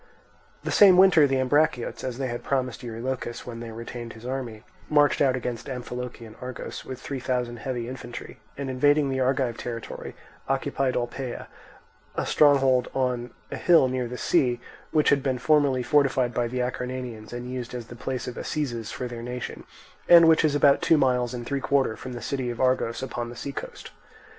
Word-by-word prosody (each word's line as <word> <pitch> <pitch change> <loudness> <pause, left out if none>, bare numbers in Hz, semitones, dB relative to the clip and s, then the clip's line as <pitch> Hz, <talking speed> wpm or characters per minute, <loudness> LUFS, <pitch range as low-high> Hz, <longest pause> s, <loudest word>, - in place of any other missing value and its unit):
The - - -2
same 190 -3 +7
winter 180 -6 +7
the 135 -1 +1
Ambraciots, 140 -1 +1
as 125 -2 -3
they 135 - -2
had 120 -1 -4
promised 130 -2 -1
Eurylochus 120 0 -4
when 115 -2 -7
they 115 -1 -7
retained 115 +1 -7
his 110 +2 -13
army, 125 -4 -4 0.3
marched 145 -1 +4
out 135 -3 +4
against 120 -2 -4
Amphilochian 125 -3 -6
Argos 125 0 -6
with 130 -1 -7
three 135 +1 -5
thousand 125 -2 -2
heavy 120 -1 -4
infantry, 120 -1 -8 0.2
and 140 -1 -4
invading 145 +2 +3
the 130 0 -1
Argive 130 -2 +1
territory 115 -2 -6 0.3
occupied 135 -1 0
Olpae, 125 +1 -3 0.7
a - - -1
stronghold 135 -4 +4
on 125 -2 0 0.2
a - - -3
hill 170 -7 +5
near 125 -1 -2
the 125 +1 -6
sea, 120 -1 +2 0.3
which 155 -1 +3
had 140 - +4
been 130 -2 0
formerly 140 -1 +3
fortified 135 -4 +2
by 120 0 0
the 125 +1 -2
Acarnanians 125 -3 -4
and 120 +1 -6
used 125 -1 -5
as 120 -2 -5
the 120 - -11
place 130 +1 -4
of 125 - -6
assizes 120 -8 -3
for 125 - -4
their 120 -1 -7
nation, 125 +1 -6 0.4
and 170 -1 +9
which 160 0 +5
is 150 -2 +2
about 140 -1 +5
two 160 - +4
miles 125 -3 +2
and 120 -2 -5
three 140 +2 -2
quarters 135 -6 +1
from 130 - -7
the 120 - -7
city 130 -3 -2
of 120 - -5
Argos 130 -2 +1
upon 120 -2 -4
the 120 - -9
sea 140 +4 -5
coast. - - -8
125 Hz, 185 wpm, -26 LUFS, 120-135 Hz, 0.7 s, and